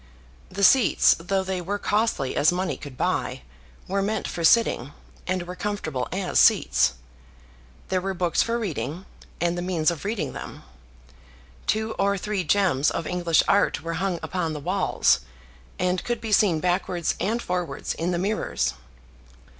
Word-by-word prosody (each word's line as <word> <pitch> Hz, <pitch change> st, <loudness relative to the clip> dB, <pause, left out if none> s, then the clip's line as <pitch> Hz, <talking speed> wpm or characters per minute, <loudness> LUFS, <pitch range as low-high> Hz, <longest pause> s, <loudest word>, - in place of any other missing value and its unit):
The 200 Hz, +2 st, -4 dB
seats, 255 Hz, +3 st, +6 dB
though 190 Hz, +3 st, -1 dB
they 190 Hz, -1 st, -3 dB
were 200 Hz, +4 st, -2 dB
costly 205 Hz, -, 0 dB
as 150 Hz, -, +4 dB
money 180 Hz, +1 st, -1 dB
could 140 Hz, -4 st, -10 dB
buy, -, -, -1 dB, 0.4 s
were 195 Hz, +1 st, 0 dB
meant 210 Hz, +1 st, -1 dB
for 170 Hz, -, -4 dB
sitting, 160 Hz, -, +3 dB, 0.3 s
and 185 Hz, -1 st, -1 dB
were 180 Hz, +1 st, -7 dB
comfortable 170 Hz, -11 st, -3 dB
as 185 Hz, 0 st, 0 dB
seats. -, -, +4 dB, 1.0 s
There 185 Hz, -1 st, +1 dB
were 195 Hz, +1 st, -3 dB
books 175 Hz, -2 st, +1 dB
for 230 Hz, 0 st, 0 dB
reading, 185 Hz, -4 st, -4 dB, 0.3 s
and 170 Hz, 0 st, +1 dB
the 175 Hz, -, -3 dB
means 175 Hz, -2 st, +1 dB
of 165 Hz, -, -6 dB
reading 205 Hz, 0 st, -2 dB
them. -, -, -8 dB, 1.0 s
Two 220 Hz, +1 st, 0 dB
or 200 Hz, 0 st, +2 dB
three 200 Hz, -1 st, -2 dB
gems 170 Hz, -6 st, +2 dB
of 165 Hz, -, -3 dB
English 175 Hz, -2 st, +2 dB
art 200 Hz, -4 st, +2 dB
were 165 Hz, 0 st, -3 dB
hung 190 Hz, -3 st, 0 dB
upon 165 Hz, -4 st, -2 dB
the 150 Hz, -, -5 dB
walls, 140 Hz, -, +2 dB, 0.6 s
and 180 Hz, 0 st, 0 dB
could 240 Hz, -1 st, -2 dB
be 225 Hz, -1 st, -5 dB
seen 195 Hz, -6 st, +4 dB
backwards 180 Hz, -1 st, 0 dB
and 225 Hz, +4 st, 0 dB
forwards 180 Hz, -9 st, -3 dB
in 170 Hz, +2 st, -2 dB
the 175 Hz, -, 0 dB
mirrors. 190 Hz, -, -1 dB
180 Hz, 160 wpm, -25 LUFS, 170-200 Hz, 1.0 s, seats